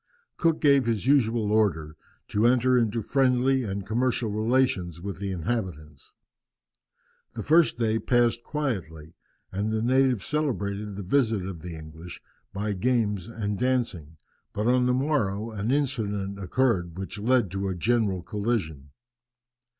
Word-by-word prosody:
Cook 165 -2 +1
gave 140 -4 +4
his 115 -2 -1
usual 115 -6 +2
order, 85 -8 +1 0.3
to 105 +3 +2
enter 125 +1 +3
into 115 -2 +1
friendly 130 +1 +2
and 100 -4 -4
commercial 120 0 0
relations 110 -6 0
with 95 +1 -6
the 100 -1 -3
inhabitants. 85 - -4 1.2
The - - -4
first 160 -3 +4
day 115 -1 +1
passed 120 -1 +2
quietly, 85 - -4 0.4
and 100 +3 -2
the 110 0 -1
natives 130 -3 +2
celebrated 105 - -2
the 100 - -5
visit 110 -2 +1
of 90 -4 -7
the 85 0 -7
English 80 +2 -10 0.3
by 105 +1 -2
games 105 -2 0
and 105 -3 -4
dancing, 115 - -1 0.4
but 105 - -2
on 125 +1 +3
the 125 - +3
morrow 115 -6 0
an 105 +1 -3
incident 105 -8 -1
occurred 95 -5 0
which 95 +2 -6
led 120 -3 +2
to 95 0 -2
a 95 - -2
general 100 -1 0
collision. 95 - -3
110 Hz, 140 wpm, -26 LUFS, 95-125 Hz, 1.2 s, gave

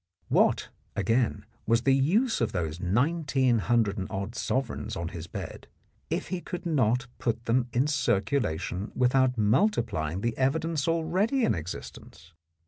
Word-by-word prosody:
What, - - +3 0.3
again, 115 +5 +1 0.2
was 115 +1 +3
the 135 - +4
use 190 - +2
of 110 -2 0
those 85 -2 -2
nineteen 130 - +2
hundred 110 -2 +1
and 95 - -3
odd 100 +3 -4
sovereigns 130 0 -2
on 85 0 -3
his 85 -3 -7
bed - - -7 0.4
if - - -2
he 185 -2 -3
could 180 +1 -6
not 125 -6 +2
put 115 0 -2
them 120 +1 +2
in 125 +4 +2
circulation 100 - 0
without 125 0 +3
multi 120 - +3
plying 80 -3 -3
the 115 0 -1
evidence 155 +3 0
already 180 +10 +1
in - - +2
existence? 80 -1 -8
120 Hz, 145 wpm, -28 LUFS, 100-140 Hz, 0.4 s, the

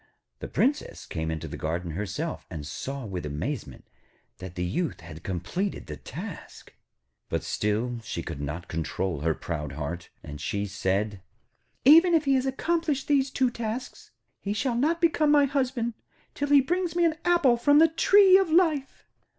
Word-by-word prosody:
The - - -5
Princess 285 +4 -1
came 80 -1 -3
into 80 -1 -4
the - - -7
garden 85 +2 -2
herself, 105 - -4
and 80 -5 -6
saw 135 - -5
with 95 -4 -5
amazement 75 0 -5 0.5
that 90 -1 -8
the 90 - -2
Youth 150 - -2
had 80 -1 -10
completed 95 - -3
the 75 - -6
task. - - -9 0.6
But - - -1
still 115 +4 -1
she - - -4
could 70 - -6
not 75 +5 -5
control 85 +1 -2
her 80 +1 0
proud 75 -4 -5
heart, 80 +4 -5
and 75 0 -8
she 100 +4 -2
said: 100 +1 -1 0.6
'Even 330 +5 +8
if 315 -2 +2
he 275 - +3
has 260 0 +2
accomplished 310 +1 -1
these 275 -2 +3
two 260 -2 +1
tasks, 235 +1 -5 0.3
he 200 - -3
shall 250 +4 0
not 315 +8 +1
become 315 -3 +3
my 295 -1 +6
husband 255 -4 -1 0.4
till 285 0 -2
he 285 -1 +7
brings 350 +4 -1
me 345 -1 +3
an 320 -1 +1
apple 345 -8 +4
from 285 +5 +4
the 325 +2 +7
tree 380 +4 +6
of 385 -3 0
life.' 315 -5 +1
215 Hz, 170 wpm, -27 LUFS, -, 0.6 s, Even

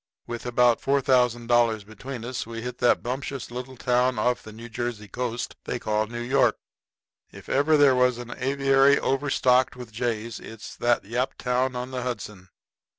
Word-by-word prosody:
With 120 +1 -6
about 120 -1 +3
$4,000 120 -5 +2
between 115 +3 -8
us 125 -2 -4
we 115 0 -6
hit 125 0 -6
that 125 - +3
bumptious 130 +1 -4
little 125 +1 -7
town 125 +1 +1
off 125 0 +1
the 110 - -11
New 115 +2 -10
Jersey 115 -2 -4
coast 120 +2 -4
they - - -2
call 110 -2 -1
New 120 +1 -5
York. 130 +3 +3 0.7
If - - -12
there - - 0
ever 145 -1 +5
was 125 -1 +3
an 120 0 -8
aviary 135 +1 +3
overstocked 130 -2 +2
with 125 -3 -9
jays 115 -1 -3
it - - -11
is - - -9
that 120 0 +2
Yaptown 125 +2 -1
on 125 +1 -4
the 130 -1 -3
Hudson. 105 -6 -6
125 Hz, 165 wpm, -25 LUFS, 115-130 Hz, 0.7 s, ever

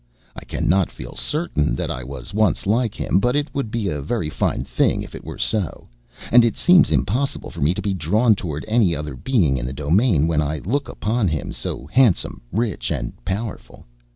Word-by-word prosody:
I - - -8
cannot 95 -1 +1
feel - - -9
certain 150 - -1
that - - -2
I 65 - -4
was 65 +1 -8
once 110 -2 +1
like 115 +2 +1
him, 95 - +1
but 125 +6 +1
it 145 -2 -1
would 140 -6 -2
be 110 -2 -2
a 75 -5 -2
very 75 - -2
fine - - -1
thing - - +1
if - - -11
it - - -8
were - - -7
so; 105 -7 -1 0.4
and 120 0 +8
it 115 - +1
seems 180 -1 +5
impossible 130 +8 -1
for - - -8
me 75 +6 +3
to - - -4
be 100 - 0
drawn 105 +7 +3
toward 75 -6 -4
any 110 -6 +3
other 75 -2 -5
being 80 - +1
in - - -4
the 65 - -4
domain 80 - +2
when 80 -2 +1
I 75 +1 -1
look 135 +5 -1
upon 110 0 0
him, 80 -3 -2
so 65 - -5
handsome, 120 - +2
rich, 105 - -1
and - - -3
powerful. 105 +3 -5
100 Hz, 205 wpm, -21 LUFS, 75-120 Hz, 0.4 s, and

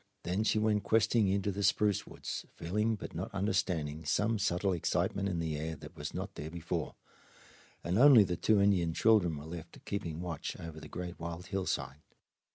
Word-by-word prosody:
Then 95 +5 0
she 110 - +2
went 105 -1 +2
questing 110 0 +3
into 100 +1 +1
the 100 +1 -4
spruce 105 0 +2
woods, - - -6
feeling 105 +6 0
but 105 - -8
not 115 - -4
understanding 90 -6 -1
some 105 +8 +1
subtle 95 -1 +1
excitement 95 +3 0
in 90 - -2
the 80 -2 -2
air 80 +2 -3
that - - -12
was - - -5
not - - -5
there 75 - -6
before, 85 0 -4 0.9
and 90 +5 +1
only 135 -5 +9
the 90 -2 -1
two 110 +3 +3
Indian 90 -5 +3
children 100 -8 +4
were 75 - -8
left 80 0 -9
keeping 85 -6 -3
watch 85 -4 -4
over 80 -2 -7
the - - -10
great 90 -1 -6
wild 85 +1 -5
hillside. 95 -6 -3
90 Hz, 180 wpm, -32 LUFS, 85-105 Hz, 0.9 s, only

